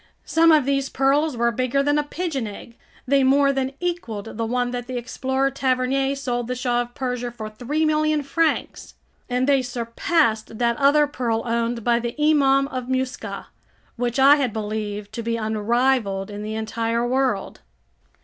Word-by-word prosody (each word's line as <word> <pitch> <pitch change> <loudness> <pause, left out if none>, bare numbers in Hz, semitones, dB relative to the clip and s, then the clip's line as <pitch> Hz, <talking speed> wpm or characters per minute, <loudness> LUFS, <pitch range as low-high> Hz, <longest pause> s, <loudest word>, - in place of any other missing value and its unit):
Some 330 0 +4
of 305 -4 +4
these 275 -1 0
pearls 275 +1 +1
were 235 0 +2
bigger 255 +3 0
than 290 +1 +2
a - - 0
pigeon 295 -6 -3
egg; 220 +3 -10 0.3
they 275 +1 +3
more 275 +1 +4
than 270 0 -2
equaled 240 - -4
the 225 0 -2
one 245 +1 0
that 245 -1 -5
the 255 -1 -4
explorer 265 +3 -1
Tavernier 270 +1 0
sold 245 -4 -3
the 250 - -2
Shah 245 -1 0
of 240 0 -8
Persia 250 -2 -3
for 220 -2 -8
3,000,000 305 +5 0
francs, 325 +3 -1 0.3
and 250 +1 +1
they 275 -2 +4
surpassed 235 -1 -1
that 235 0 +1
other 290 +2 +4
pearl 240 -6 -2
owned 235 0 -1
by 235 0 +2
the 235 0 -4
Imam 275 -3 +4
of 255 -2 -5
Muscat, 260 +1 -3 0.5
which 240 0 -2
I 275 +2 +7
had 265 -5 0
believed 210 -1 -4
to 230 - -4
be 230 0 -2
unrivaled 220 -2 0
in 205 0 -6
the 215 +1 -4
entire 230 +2 -1
world. 260 +1 -1
250 Hz, 170 wpm, -23 LUFS, 230-275 Hz, 0.5 s, I